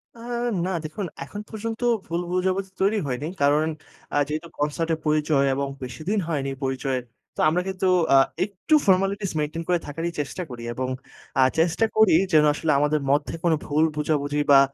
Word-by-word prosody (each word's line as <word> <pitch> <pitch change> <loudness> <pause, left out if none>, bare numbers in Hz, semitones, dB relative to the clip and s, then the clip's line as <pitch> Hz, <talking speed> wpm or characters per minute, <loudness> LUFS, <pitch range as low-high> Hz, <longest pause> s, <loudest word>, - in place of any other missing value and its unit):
আ - - -14 0.5
না, - - -1
দেখুন 155 +6 -4 0.2
এখন 205 +9 -7
পর্যন্ত 225 +1 -5 0.2
ভুল 170 +1 -2
বুঝাবুঝি 190 +1 0
তৈরি 200 +3 +3
হয়নি। 130 +3 -3
কারণ 145 +2 +4 0.5
আ - - +3
যেহেতু 155 +3 -4
কনসার্টের 160 +2 -1
পরিচয় 150 -2 +2
এবং 140 +1 -1
বেশিদিন 155 - -2
হয়নি 140 -4 -1
পরিচয়ের। 130 -1 -1 0.3
তো - - -10
আমরা 175 +3 +1
কিন্তু 190 0 -1 0.3
আ - - +8 0.3
একটু 200 +9 -3
ফরমালিটিস 195 +1 +2
মেইনটেইন 155 +2 -2
করে 180 -1 +2
থাকারই 165 +4 -3
চেষ্টা 145 +5 -3
করি 120 -1 -8
এবং 130 +1 -3 0.5
আ - - +7 0.2
চেষ্টা 175 +6 +3
করি 220 -4 +5 0.2
যেন 155 -1 +7
আসলে 155 +1 0
আমাদের 150 +1 +1
মধ্যে 145 +1 +1
কোনো 170 -2 +3
ভুল 150 +1 +2
বোঝাবুঝি 150 -1 0
বা 140 - +9
155 Hz, 165 wpm, -24 LUFS, 145-185 Hz, 0.5 s, বা